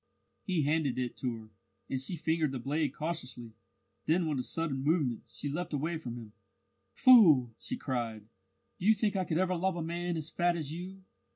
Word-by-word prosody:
He 180 Hz, -6 st, 0 dB
handed 150 Hz, -2 st, +1 dB
it 125 Hz, -2 st, -2 dB
to 125 Hz, -3 st, -2 dB
her, 110 Hz, -1 st, -13 dB, 0.4 s
and 130 Hz, -1 st, -2 dB
she 155 Hz, +7 st, -2 dB
fingered 160 Hz, -2 st, 0 dB
the 135 Hz, -, -3 dB
blade 145 Hz, +3 st, -1 dB
cautiously. 135 Hz, -7 st, -5 dB, 0.5 s
Then 170 Hz, +2 st, +3 dB
with 150 Hz, -4 st, -1 dB
a -, -, -1 dB
sudden 165 Hz, -2 st, -2 dB
movement 145 Hz, -5 st, +1 dB
she -, -, -6 dB
leaped 160 Hz, +4 st, -3 dB
away 160 Hz, +3 st, -1 dB
from 120 Hz, -6 st, -6 dB
him. 115 Hz, -3 st, -10 dB, 0.6 s
"Fool!" 160 Hz, -, +7 dB
she -, -, -4 dB
cried. 115 Hz, -5 st, -3 dB, 0.6 s
"Do 185 Hz, -, -1 dB
you 220 Hz, -, +7 dB
think 210 Hz, -1 st, 0 dB
I 190 Hz, -1 st, 0 dB
could 160 Hz, -, -1 dB
ever 185 Hz, 0 st, +2 dB
love 185 Hz, +1 st, 0 dB
a 170 Hz, -, -3 dB
man 170 Hz, +1 st, -2 dB
as 155 Hz, -1 st, -4 dB
fat 175 Hz, 0 st, +1 dB
as 155 Hz, -2 st, -4 dB
you? 185 Hz, +3 st, -8 dB
155 Hz, 195 wpm, -31 LUFS, 130-175 Hz, 0.6 s, Fool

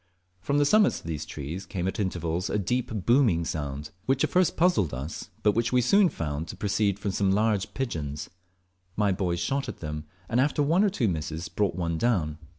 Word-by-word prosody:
From 140 Hz, +10 st, 0 dB
the 145 Hz, -, +4 dB
summits 210 Hz, +7 st, +4 dB
of -, -, -18 dB
these 80 Hz, -2 st, -4 dB
trees 80 Hz, +6 st, -6 dB
came 90 Hz, -2 st, -2 dB
at 95 Hz, -, -3 dB
intervals 90 Hz, -3 st, -1 dB
a -, -, 0 dB
deep 110 Hz, -1 st, -2 dB
booming 115 Hz, -10 st, +4 dB
sound, 75 Hz, -1 st, -4 dB, 0.2 s
which 135 Hz, +1 st, +2 dB
at -, -, +1 dB
first 185 Hz, -1 st, +2 dB
puzzled 160 Hz, -, +2 dB
us, 70 Hz, +6 st, -6 dB
but 105 Hz, -, +5 dB
which 115 Hz, +3 st, 0 dB
we 125 Hz, -, +4 dB
soon 190 Hz, -, +5 dB
found 75 Hz, -, -4 dB
to -, -, -7 dB
proceed 100 Hz, -1 st, +1 dB
from 100 Hz, 0 st, -2 dB
some 95 Hz, 0 st, +1 dB
large 105 Hz, -1 st, +1 dB
pigeons. 75 Hz, -, -3 dB, 0.7 s
My 105 Hz, -1 st, +2 dB
boys 90 Hz, -2 st, -1 dB
shot 135 Hz, +10 st, -1 dB
at -, -, -6 dB
them, 75 Hz, -1 st, -5 dB, 0.2 s
and 120 Hz, +3 st, +2 dB
after 145 Hz, +1 st, +2 dB
one 165 Hz, +7 st, +3 dB
or 210 Hz, -, +4 dB
two 140 Hz, -, 0 dB
misses, 80 Hz, +1 st, -3 dB
brought 100 Hz, -5 st, 0 dB
one 85 Hz, -2 st, -2 dB
down. 85 Hz, -11 st, 0 dB
100 Hz, 205 wpm, -27 LUFS, 80-125 Hz, 0.7 s, but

